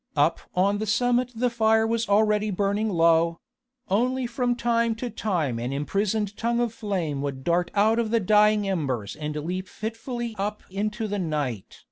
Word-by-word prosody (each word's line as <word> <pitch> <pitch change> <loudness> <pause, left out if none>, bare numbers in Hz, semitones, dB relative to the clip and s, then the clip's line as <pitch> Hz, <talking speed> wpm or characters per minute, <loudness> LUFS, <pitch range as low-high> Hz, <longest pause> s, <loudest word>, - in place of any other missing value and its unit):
Up - - +3 0.2
on 200 +3 +2
the 215 - -3
summit 245 +3 +2
the 245 +2 0
fire 220 -1 +3
was 230 -1 -1
already 210 +1 +3
burning 200 +2 0
low; 165 -2 +3 0.5
only 250 +6 +1
from 245 +1 0
time 235 -1 +1
to 240 +1 -5
time 160 - -1
an 120 +2 -3
imprisoned 200 +8 -1
tongue 235 +1 0
of 240 -2 0
flame 185 - -2
would 135 -2 -4
dart 175 +2 +1
out 220 +3 +3
of 230 -2 0
the 230 +1 +2
dying 210 0 +4
embers 135 - -2
and 150 0 -5
leap 180 +5 -3
fitfully 230 +3 -5
up 210 +1 -3
into 215 +3 -2
the 205 0 -2
night. 145 - -3
210 Hz, 170 wpm, -25 LUFS, 170-230 Hz, 0.5 s, dying